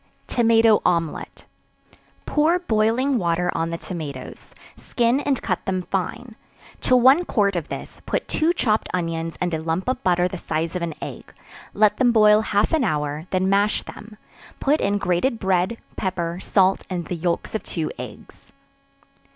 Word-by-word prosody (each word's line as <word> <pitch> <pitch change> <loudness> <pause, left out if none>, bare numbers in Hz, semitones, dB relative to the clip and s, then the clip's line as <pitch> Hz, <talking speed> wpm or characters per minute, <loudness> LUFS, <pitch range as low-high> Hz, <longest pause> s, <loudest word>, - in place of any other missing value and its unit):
Tomato 225 -2 +4
Omelet. 170 -3 -1 0.8
Pour 310 +4 +2
boiling 245 -2 +1
water 175 -1 0
on 165 0 -1
the 170 - -3
tomatoes, 150 -8 -8 0.2
skin 240 +2 0
and 280 -3 0
cut 185 -4 -1
them 185 -1 -1
fine; 195 +6 -4 0.5
to 255 - +3
one 260 +7 +6
quart 200 - +1
of 165 -3 -2
this, - - -8
put - - -1
two 320 +2 +1
chopped 220 -10 0
onions 165 -2 -3
and 175 -1 -1
a 160 - -1
lump 165 +5 -2
of 255 0 -1
butter 180 -1 +3
the 180 0 -6
size 165 +2 -3
of 180 - -2
an 165 -3 -3
egg; - - -8 0.4
let 210 0 +3
them 250 -2 +4
boil 215 -2 +6
half 210 +2 +1
an 315 -4 +3
hour, 150 -3 -2
then 185 0 0
mash 200 +2 +2
them; 215 0 -11 0.4
put 290 +3 +2
in 200 +1 +1
grated 185 +7 0
bread, 190 +3 +1 0.2
pepper, 175 -3 -3
salt, 190 -1 +2
and 175 -2 -3
the 180 - -4
yelks 170 0 -2
of 220 - -2
two 160 -3 -4
eggs. - - -11
190 Hz, 165 wpm, -22 LUFS, 170-230 Hz, 0.8 s, one